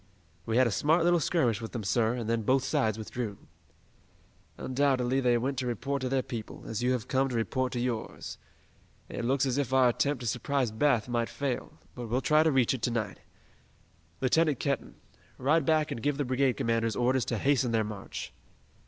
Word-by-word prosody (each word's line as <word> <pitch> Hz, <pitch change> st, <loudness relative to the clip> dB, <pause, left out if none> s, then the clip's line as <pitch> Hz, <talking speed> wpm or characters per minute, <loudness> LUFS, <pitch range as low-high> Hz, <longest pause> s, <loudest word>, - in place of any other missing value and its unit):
"We 115 Hz, +1 st, +1 dB
had 130 Hz, -, +6 dB
a 115 Hz, -, +1 dB
smart 160 Hz, -, +2 dB
little 175 Hz, 0 st, +4 dB
skirmish 125 Hz, -, +1 dB
with 115 Hz, -, -7 dB
them, 115 Hz, -3 st, -3 dB
sir, 115 Hz, +3 st, +2 dB
and 120 Hz, -3 st, -4 dB
then 115 Hz, 0 st, +1 dB
both 130 Hz, +4 st, +2 dB
sides 110 Hz, -5 st, +1 dB
withdrew." 110 Hz, -1 st, -5 dB, 1.2 s
"Undoubtedly 130 Hz, -1 st, +1 dB
they 125 Hz, -2 st, +3 dB
went 130 Hz, +2 st, -1 dB
to 125 Hz, -, -2 dB
report 135 Hz, +4 st, -2 dB
to 130 Hz, -, -1 dB
their 130 Hz, -1 st, +1 dB
people, 115 Hz, -3 st, -7 dB
as 110 Hz, 0 st, -4 dB
you 125 Hz, +1 st, +2 dB
have 125 Hz, -1 st, -3 dB
come 135 Hz, 0 st, +1 dB
to 125 Hz, -, -3 dB
report 125 Hz, +3 st, 0 dB
to 120 Hz, -, -2 dB
yours. 120 Hz, -2 st, -4 dB, 0.7 s
It -, -, -4 dB
looks 135 Hz, +3 st, +2 dB
as 130 Hz, +1 st, 0 dB
if 135 Hz, -3 st, -1 dB
our 130 Hz, -2 st, +5 dB
attempt 140 Hz, +2 st, 0 dB
to -, -, -5 dB
surprise 125 Hz, +1 st, 0 dB
Bath 120 Hz, -1 st, +2 dB
might 120 Hz, -1 st, -1 dB
fail, 140 Hz, -3 st, -3 dB, 0.2 s
but 120 Hz, -1 st, -6 dB
we'll 120 Hz, +3 st, 0 dB
try 150 Hz, +2 st, +4 dB
to 160 Hz, 0 st, +3 dB
reach 130 Hz, -3 st, +3 dB
it 130 Hz, -, -4 dB
to 125 Hz, -, +1 dB
night. 115 Hz, -3 st, -3 dB, 1.0 s
Lieutenant 150 Hz, +1 st, +2 dB
Kenton, 140 Hz, -1 st, -2 dB, 0.4 s
ride 145 Hz, +3 st, +2 dB
back 155 Hz, -1 st, +2 dB
and 115 Hz, -, -4 dB
give 145 Hz, +3 st, 0 dB
the 145 Hz, -, -1 dB
brigade 130 Hz, +1 st, +2 dB
commanders 115 Hz, -1 st, 0 dB
orders 125 Hz, +1 st, +2 dB
to 120 Hz, -, -1 dB
hasten 130 Hz, 0 st, +2 dB
their 110 Hz, -1 st, +2 dB
march." 105 Hz, -2 st, -7 dB
125 Hz, 200 wpm, -29 LUFS, 115-135 Hz, 1.2 s, had